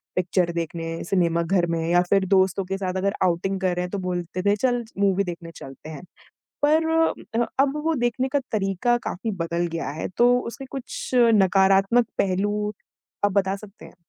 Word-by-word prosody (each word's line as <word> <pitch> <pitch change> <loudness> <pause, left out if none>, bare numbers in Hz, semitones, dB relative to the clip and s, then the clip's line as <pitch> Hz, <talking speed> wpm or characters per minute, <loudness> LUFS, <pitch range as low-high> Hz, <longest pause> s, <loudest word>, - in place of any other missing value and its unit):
Picture 180 -1 +1
देखने 165 0 -4
cinema 170 -2 +1
घर 180 +1 +1
में 165 -1 0
या 175 +1 +4
फिर 195 -1 +3
दोस्तों 190 0 +3
के 195 +1 -3
साथ 185 -2 -3
अगर 200 +1 0
आउटिंग 185 +2 0
कर 185 -1 +1
रहे 180 - -1
हैं - - -7
तो 200 - -2
बोलते 180 0 -3
थे 205 0 +3
चल 245 +1 0 0.2
मूवी 200 -1 +2
देखने 170 -2 -7
चलते 135 +3 -10
हैं, 155 -1 -8 0.6
पर 315 +2 +3 0.5
अ, 240 - +2
अब 275 +1 +2
वो 325 0 +2
देखने 255 +2 0
का 285 - +1
तरीका 200 +3 +1
काफ़ी 220 +5 -4
बदल 170 +1 -1
गया 165 -3 -3
है - - -2
तो 245 +1 +5
उसके 250 +3 -7
कुछ 270 -2 -6 0.3
नकारात्मक 195 +5 +4
पहलू 205 +2 0 0.5
आप 205 - +3
बता 195 0 +1
सकते 205 0 -14
हैं? - - -14
195 Hz, 185 wpm, -24 LUFS, 175-210 Hz, 0.6 s, तो